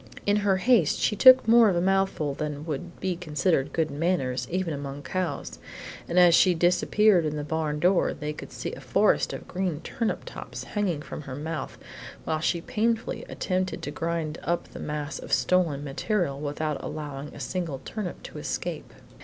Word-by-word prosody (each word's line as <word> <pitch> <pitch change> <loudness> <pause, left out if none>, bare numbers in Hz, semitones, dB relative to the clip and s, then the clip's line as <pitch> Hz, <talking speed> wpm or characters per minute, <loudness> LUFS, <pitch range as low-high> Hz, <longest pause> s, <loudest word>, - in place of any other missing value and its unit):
In 205 +1 +3
her 200 -2 +2
haste 205 - +3
she 210 - +1
took 255 +2 +8
more 230 -1 +7
of 185 - +1
a - - +2
mouthful 190 -5 +1
than 150 +1 -4
would 170 +2 -5
be 185 -2 -1
considered 155 -3 0
good 160 -2 0
manners 140 -6 -1
even 180 -2 -1
among 140 0 -6
cows, 185 +1 -3 0.5
and 170 - -1
as 175 -1 +7
she 180 +1 +5
disappeared 180 +3 +4
in 155 -1 -2
the 150 - -3
barn 155 -1 -2
door 180 +3 +3
they 150 0 -4
could - - -9
see - - -5
a - - -7
forest - - +2
of - - -7
green 180 -4 -2
tops 230 -2 -4
hanging 185 -8 -2
from - - -7
her 135 -3 -7
mouth, 155 0 -5 0.5
while 160 -1 -1
she 170 +1 0
painfully 225 +4 -1
attempted 185 0 -2
to - - -3
grind 165 -2 -3
up 170 0 -1
the - - -10
mass 150 -2 -4
of - - -9
stolen 165 -6 +2
material 145 +1 -1
without 150 0 -3
allowing 145 -2 -5
a - - -9
single 170 -7 -3
turnip 210 -5 -5
to - - -8
escape. - - -4
170 Hz, 180 wpm, -26 LUFS, 150-185 Hz, 0.5 s, took